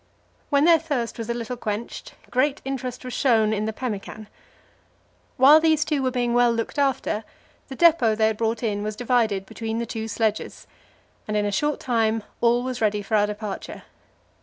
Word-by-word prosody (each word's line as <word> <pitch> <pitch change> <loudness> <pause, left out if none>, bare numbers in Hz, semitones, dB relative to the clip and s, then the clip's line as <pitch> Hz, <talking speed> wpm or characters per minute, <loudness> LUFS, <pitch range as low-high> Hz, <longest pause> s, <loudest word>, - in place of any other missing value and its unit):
When 285 0 +3
their 335 -1 +6
thirst 275 -8 -3
was 230 0 -5
a - - +1
little 240 +1 -4
quenched, 220 -1 -5 0.2
great 270 +3 +1
interest 255 -2 -5
was 250 - -6
shown 220 -5 +2
in 215 0 -1
the 220 - -1
pemmican. 215 -2 -6 1.1
While 280 +4 +8
these 315 -2 +2
two 300 -3 0
were 260 - +1
being 245 -2 -1
well 240 0 +4
looked 230 +5 -3
after, 265 -5 0 0.4
the 270 - -8
depot 305 -9 +4
they 220 0 +2
had 220 -1 0
brought 225 +1 -1
in 205 -3 -1
was 210 0 -4
divided 225 -5 0
between 225 +2 -5
the 235 - -2
two 225 0 -5
sledges, 220 -1 -2 0.6
and 210 0 -1
in 205 - +1
a 205 - -1
short 295 +9 0
time 225 -3 0 0.2
all 240 +1 +3
was 255 -2 -4
ready 210 -1 +1
for 210 - -8
our 210 0 +3
departure. 210 -1 -6
235 Hz, 185 wpm, -24 LUFS, 215-260 Hz, 1.1 s, While